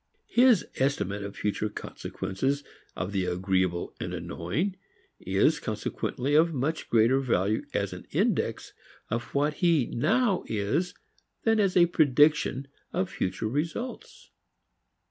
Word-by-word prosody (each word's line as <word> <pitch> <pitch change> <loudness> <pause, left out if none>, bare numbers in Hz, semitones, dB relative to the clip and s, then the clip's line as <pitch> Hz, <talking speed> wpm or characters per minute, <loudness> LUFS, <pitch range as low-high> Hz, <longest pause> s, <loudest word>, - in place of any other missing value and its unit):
His 245 -5 +5
estimate 105 -7 0
of 100 0 -6
future 105 +1 -1
consequences 105 +8 -3 0.3
of 95 - -3
the 95 -2 0
agreeable 90 -1 0
and - - -4
annoying 150 - -2 0.4
is - - +2
consequently 135 +3 -3
of 160 +1 +4
much 145 +5 -2
greater 120 +4 +4
value 110 -5 0
as - - 0
an - - -10
index - - 0 0.4
of 115 +2 -1
what 145 +2 +2
he 165 -7 +4
now 200 - +1
is 135 - -1 0.5
than 225 -1 +3
as 195 -3 +2
a 175 - +7
prediction 150 -3 +3 0.2
of 185 0 -1
future 95 +3 -2
results. 165 - -4
135 Hz, 125 wpm, -28 LUFS, 100-170 Hz, 0.5 s, a